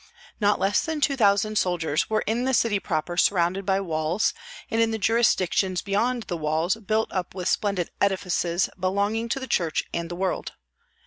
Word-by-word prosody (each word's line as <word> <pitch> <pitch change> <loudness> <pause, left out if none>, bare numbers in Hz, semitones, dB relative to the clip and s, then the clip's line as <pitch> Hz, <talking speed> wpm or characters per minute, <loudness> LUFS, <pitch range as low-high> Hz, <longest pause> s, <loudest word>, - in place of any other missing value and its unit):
Not 205 -1 +2
less 195 +1 +2
than 320 -1 -3
two 280 -1 +2
thousand 215 -2 +3
soldiers 165 -4 0
were 215 0 +1
in 230 +3 0
the 265 0 +2
city 220 -3 +2
proper 175 0 -3
surrounded 185 +1 +2
by 195 0 +2
walls, 165 +1 0 0.4
and 225 - +2
in 225 - +3
the 220 - -2
jurisdictions 195 -4 +2
beyond 230 +4 0
the 175 - -4
walls 160 +4 0
built 220 0 -1
up 185 -1 -3
with 180 -2 -3
splendid 195 -5 0
edifices 185 -2 +1
belonging 200 +5 0
to 270 - -1
the 260 - -5
church 170 -10 0
and 170 0 -3
the 175 - -5
world. 190 +1 -2
195 Hz, 180 wpm, -25 LUFS, 175-220 Hz, 0.4 s, thousand